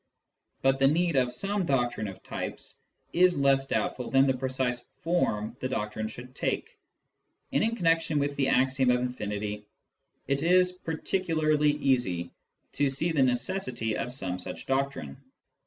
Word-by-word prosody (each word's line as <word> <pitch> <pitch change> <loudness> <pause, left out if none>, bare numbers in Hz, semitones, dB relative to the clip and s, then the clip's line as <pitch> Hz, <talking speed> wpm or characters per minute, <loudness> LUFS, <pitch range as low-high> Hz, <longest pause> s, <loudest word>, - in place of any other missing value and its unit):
But 135 0 +3
the 135 - +5
need 165 +2 +2
of 125 -2 +2
some 200 +8 -1
doctrine 120 -5 0
of 95 - -9
types - - -6 0.4
is 180 0 +4
less 135 -1 +3
doubtful 125 - -1
than 135 0 +5
the 135 - +3
precise 130 -1 -2 0.2
form 130 -11 0
the 130 - -2
doctrine 110 -3 -2
should 120 +3 -10
take; - - -2 0.8
and - - +3
in 225 +1 +1
connection 165 -5 +2
with 145 0 0
the 135 -1 +1
axiom 130 0 +3
of 125 0 +4
infinity 105 -4 -4 0.6
it 140 0 0
is 180 +2 +4
particularly 160 -3 0
easy 120 -12 0 0.4
to 145 -1 +1
see 160 +6 -1
the 150 -4 +2
necessity 125 - 0
of 125 - -3
some 95 -8 -3
such - - -6
doctrine. 135 - -2
135 Hz, 150 wpm, -28 LUFS, 120-155 Hz, 0.8 s, the